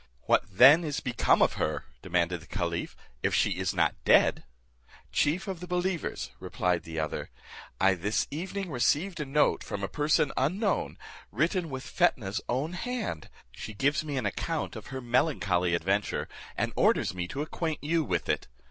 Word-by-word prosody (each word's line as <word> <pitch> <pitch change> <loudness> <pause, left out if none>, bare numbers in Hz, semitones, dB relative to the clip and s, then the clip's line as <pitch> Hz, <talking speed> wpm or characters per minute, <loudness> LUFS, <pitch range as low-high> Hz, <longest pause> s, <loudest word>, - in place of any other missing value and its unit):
"What - - +3
then 135 - +7
is 150 -3 -2
become 125 -2 +3
of - - +2
her," - - -1 0.2
demanded 90 -1 0
the 85 - -15
caliph, 85 -4 -3 0.3
"if - - +1
she - - +3
is - - 0
not - - 0
dead?" - - +4 0.7
"Chief 170 +7 +1
of 190 -3 -4
the 180 - -8
believers," 180 -1 -2
replied 90 -2 -1
the 80 +1 -6
other, 80 - -3 0.5
"I 95 0 +5
this 100 +4 -1
evening 185 +4 -4
received 155 +8 +1
a 150 - -2
note 145 +2 +2
from 100 - -5
a - - 0
person 145 - +1
unknown, 190 - 0 0.3
written 165 - 0
with 130 -1 -6
Fetnah's 110 - +1
own 135 +8 -1
hand; 215 - -4 0.2
she 110 - -8
gives 145 +7 +1
me 145 -3 -3
an 125 - -1
account 155 +10 -2
of 110 - -8
her 130 -1 -5
melancholy 100 - +1
adventure, 95 +4 0 0.3
and - - -1
orders - - +3
me 90 -1 -3
to 140 +10 -3
acquaint 160 0 -3
you 160 +2 +1
with 90 - -2
it. - - -1
135 Hz, 170 wpm, -29 LUFS, -, 0.7 s, then